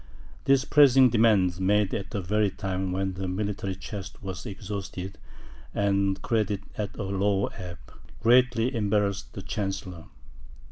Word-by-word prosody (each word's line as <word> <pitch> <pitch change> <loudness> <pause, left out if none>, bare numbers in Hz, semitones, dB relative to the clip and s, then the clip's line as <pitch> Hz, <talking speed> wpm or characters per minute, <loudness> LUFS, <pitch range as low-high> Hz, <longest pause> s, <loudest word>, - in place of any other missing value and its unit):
These 135 0 +4
pressing 135 -3 +6
demands, 105 -6 +3
made 100 +1 +2
at 100 -1 -3
the 100 - -3
very 105 +3 +1
time 95 -1 -3
when 95 +1 -1
the 95 +1 -4
military 100 0 -2
chest 95 +1 -8
was 95 -2 -6
exhausted, 100 -1 -6 0.6
and 100 -1 +1
credit 105 -3 0
at 105 -2 -4
a 105 - -3
low 100 +1 +1
ebb, 90 -2 -7 0.4
greatly 120 +1 +4
embarrassed 105 -3 0
the - - -7
chancellor. 95 -4 -4
100 Hz, 135 wpm, -27 LUFS, 95-105 Hz, 0.6 s, pressing